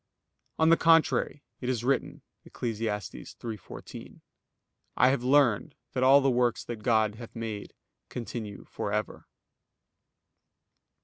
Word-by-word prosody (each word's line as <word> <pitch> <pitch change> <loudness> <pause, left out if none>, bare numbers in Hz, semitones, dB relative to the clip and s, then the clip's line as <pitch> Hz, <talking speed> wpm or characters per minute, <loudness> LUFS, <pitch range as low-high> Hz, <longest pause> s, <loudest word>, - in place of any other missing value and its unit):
On 160 0 +4
the 165 - +6
contrary, 165 -3 +3 0.2
It 125 - -3
is 120 -3 -1
written 135 +1 -1 0.2
(Eccles. 115 -3 -4
3:14): 110 +1 -6 0.8
"I 125 - +6
have 130 -2 0
learned 130 -5 +3 0.2
that 125 - -1
all 135 +2 +7
the 135 -1 +3
works 120 -1 +1
that 120 - -5
God 110 -2 +2
hath 115 0 -10
made 110 -3 -5 0.3
continue 115 -4 -6
for 100 - -4
ever." 105 +1 -3
120 Hz, 120 wpm, -28 LUFS, 110-135 Hz, 0.8 s, all